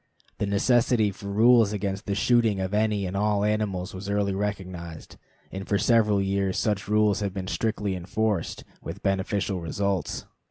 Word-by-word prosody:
The 105 - 0
necessity 110 +1 +2
for 100 +1 -10
rules 110 +1 +5
against 100 0 -3
the 100 - 0
shooting 115 -2 +2
of 95 +1 -3
any 105 -2 +1
and 90 +1 -4
all 105 0 +1
animals 105 -3 -1
was 95 +2 -6
early 100 -1 0
recognized, 95 -5 -5 0.4
and 95 +1 -6
for 100 - +3
several 105 -3 +3
years 95 -1 0
such 105 -4 -1
rules 105 -1 +3
have 100 -2 -3
been 95 -1 -3
strictly 105 -1 -1
enforced 95 +1 -2 0.2
with - - -8
beneficial 95 -1 -1
results. 100 +3 -2
100 Hz, 160 wpm, -26 LUFS, 95-105 Hz, 0.4 s, rules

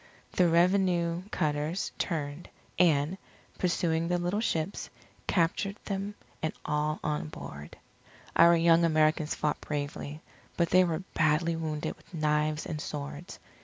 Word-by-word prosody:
The 180 -2 +3
revenue 175 -1 +3
cutters 155 +1 -1
turned, 150 -2 -3 0.3
and, 165 +1 +3 0.4
pursuing 170 -2 +1
the 175 +1 +1
little 175 +4 -1
ships, 175 -4 -2 0.4
captured 195 +3 +1
them 200 +1 -3 0.3
and 160 - -1
all 150 0 0
on 150 - -1
board. 75 0 -9 0.6
Our 170 +1 +7
young 165 0 +5
Americans 155 -1 +2
fought 150 - -1
bravely, 145 +1 -4 0.4
but 170 -1 +1
they 185 0 +7
were 170 0 -1
badly 165 +1 +2
wounded 155 -2 -3
with - - -14
knives 150 0 +1
and 155 -2 -4
swords. 145 +3 -6
165 Hz, 130 wpm, -29 LUFS, 150-175 Hz, 0.6 s, Our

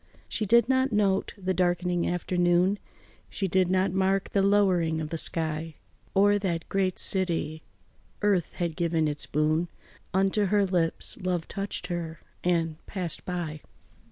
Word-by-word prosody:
She 215 - -2
did 235 +4 +5
not 260 0 +2
note 200 -3 +1
the 185 -1 -1
darkening 175 -1 +1
afternoon, 175 +2 +2 0.5
She 195 - -2
did 185 0 +2
not 185 0 +2
mark 190 +1 +1
the 200 - +2
lowering 185 -5 +3
of 155 -1 -4
the 165 - -2
sky 160 -1 -1 0.4
O'er 205 +1 +4
that 170 -4 -2
great 190 -2 0
city. 170 -4 0 0.6
Earth 195 -5 +2
had 170 -3 -2
given 165 -2 +1
its 150 0 -3
boon 155 +3 +1 0.4
Unto 195 +2 +2
her 200 +1 +3
lips, 175 -3 -1
love 180 -2 -1
touched 200 -2 -4
her 170 -2 -4 0.2
and 165 -3 0
passed 180 -5 -3
by. 165 -4 -4
180 Hz, 145 wpm, -27 LUFS, 165-195 Hz, 0.6 s, did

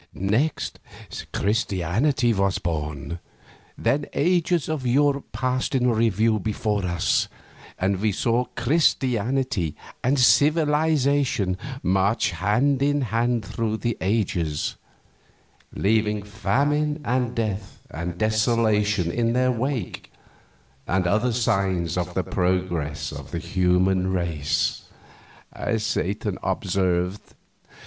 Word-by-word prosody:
Next, 110 +11 -1 0.5
Christianity 110 - +1
was 100 -2 +1
born. 75 0 -4 0.6
Then 145 +1 0
ages 175 0 +2
of 155 -4 -2
Europe 140 +3 +1
passed 130 +1 -1
in 125 -1 +3
review 110 -1 +2
before 105 0 -1
us, 85 0 +1 0.5
and 95 +1 0
we 110 0 +2
saw 120 +5 +1
Christianity 125 - 0 0.3
and 135 +3 +2
Civilization 145 - +3 0.3
march 95 +4 +2
hand 110 - +1
in 145 +1 +2
hand 120 -1 +1
through 110 +1 -2
those 120 +1 -1
ages, 90 -7 -1 1.0
"leaving 105 0 +1
famine 145 +8 0
and 125 0 0
death 105 -3 -3
and 85 +3 -5
desolation 110 -4 +2
in 115 +2 0
their 130 +1 +2
wake, 125 -3 -3 0.8
and 95 0 +1
other 110 +7 +2
signs 95 -7 0
of 90 0 -3
the 95 - +1
progress 90 -6 -1
of 70 -1 -8
the 85 - -4
human 90 +1 +1
race," 80 -6 -1 0.7
as 110 -1 -2
Satan 105 -2 -2
observed. 95 -1 0
110 Hz, 105 wpm, -24 LUFS, 90-125 Hz, 1.0 s, in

